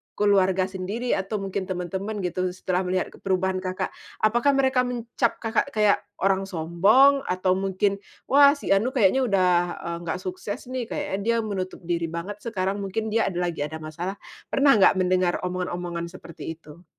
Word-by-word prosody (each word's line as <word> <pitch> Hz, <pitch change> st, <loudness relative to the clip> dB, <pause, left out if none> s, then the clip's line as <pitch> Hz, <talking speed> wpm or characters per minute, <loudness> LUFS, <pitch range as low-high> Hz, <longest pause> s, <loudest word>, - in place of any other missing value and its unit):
keluarga 190 Hz, -2 st, +3 dB
sendiri 195 Hz, +6 st, -3 dB
atau 195 Hz, +2 st, -1 dB
mungkin 190 Hz, -1 st, -3 dB
teman-teman 190 Hz, +3 st, -4 dB
gitu, 185 Hz, +1 st, -1 dB
setelah 185 Hz, 0 st, -1 dB
melihat 185 Hz, 0 st, -1 dB
ke -, -, -15 dB
perubahan 190 Hz, -1 st, 0 dB
Kakak? 185 Hz, 0 st, -3 dB, 0.3 s
Apakah 240 Hz, +6 st, +3 dB
mereka 265 Hz, -1 st, +2 dB
mencap 235 Hz, 0 st, -1 dB
Kakak 225 Hz, +4 st, +1 dB
kayak 210 Hz, -1 st, +4 dB, 0.2 s
orang 195 Hz, 0 st, +2 dB
sombong 195 Hz, -, +4 dB
atau 185 Hz, 0 st, +1 dB
mungkin, 195 Hz, +1 st, 0 dB, 0.3 s
wah 280 Hz, +1 st, +7 dB
si 285 Hz, -, -4 dB
anu 230 Hz, +8 st, +2 dB
kayaknya 235 Hz, +3 st, +4 dB
udah, 190 Hz, -4 st, +3 dB, 0.3 s
eee, 170 Hz, 0 st, -3 dB
nggak 165 Hz, +2 st, -2 dB
sukses 190 Hz, +5 st, -5 dB
nih, 255 Hz, -1 st, -2 dB
kayaknya 195 Hz, -, -3 dB
dia 235 Hz, +1 st, +2 dB
menutup 190 Hz, -3 st, -4 dB
diri 170 Hz, -1 st, -1 dB
banget 170 Hz, +5 st, -6 dB
sekarang, 200 Hz, -3 st, -2 dB
mungkin 215 Hz, +3 st, -3 dB
dia 225 Hz, +1 st, +2 dB
ada 175 Hz, -2 st, -3 dB
lagi 175 Hz, -3 st, -3 dB
ada 150 Hz, +2 st, -5 dB
masalah. 170 Hz, +5 st, -5 dB, 0.3 s
Pernah 280 Hz, +1 st, +4 dB
nggak 190 Hz, -, +6 dB
mendengar 185 Hz, -1 st, +2 dB
omongan-omongan 175 Hz, -1 st, -3 dB
seperti 170 Hz, -3 st, -8 dB
itu? 160 Hz, +2 st, -16 dB
190 Hz, 165 wpm, -25 LUFS, 180-215 Hz, 0.3 s, wah